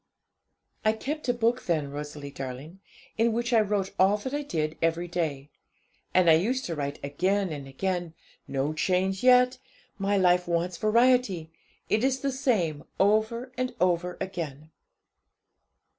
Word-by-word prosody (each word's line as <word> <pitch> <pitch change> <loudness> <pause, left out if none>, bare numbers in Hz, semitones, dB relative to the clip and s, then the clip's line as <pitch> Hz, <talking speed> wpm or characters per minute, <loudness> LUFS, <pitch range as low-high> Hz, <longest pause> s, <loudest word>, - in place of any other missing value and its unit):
'I 215 - +3
kept 285 +5 -4
a - - +4
book 240 +1 +1
then, 155 -5 0
Rosalie 145 0 -7
darling, 135 +7 -7 0.4
in 230 0 +3
which 235 +2 -1
I 225 - +6
wrote 200 -2 -1
all 195 +2 +5
that 260 +6 -6
I 290 - -1
did 160 - -2
every 165 +1 0
day, 150 -5 -3 0.6
and 185 -2 +4
I 165 - +8
used 240 +11 +1
to 170 - -3
write 140 -1 -3
again 185 +7 0
and 140 -3 -6
again 175 +3 -3 0.3
'"No 140 +2 -1
change 185 +4 0
yet; 250 0 +5 0.4
my 200 +1 +1
life 180 -1 +3
wants 170 +1 -1
variety. 215 -7 +2 0.4
It 215 +2 +1
is 265 0 +1
the 275 - 0
same 205 - 0 0.2
over 220 +5 +2
and 255 0 -2
over 180 0 +1
again." 155 -5 -5
185 Hz, 150 wpm, -27 LUFS, 160-230 Hz, 0.6 s, I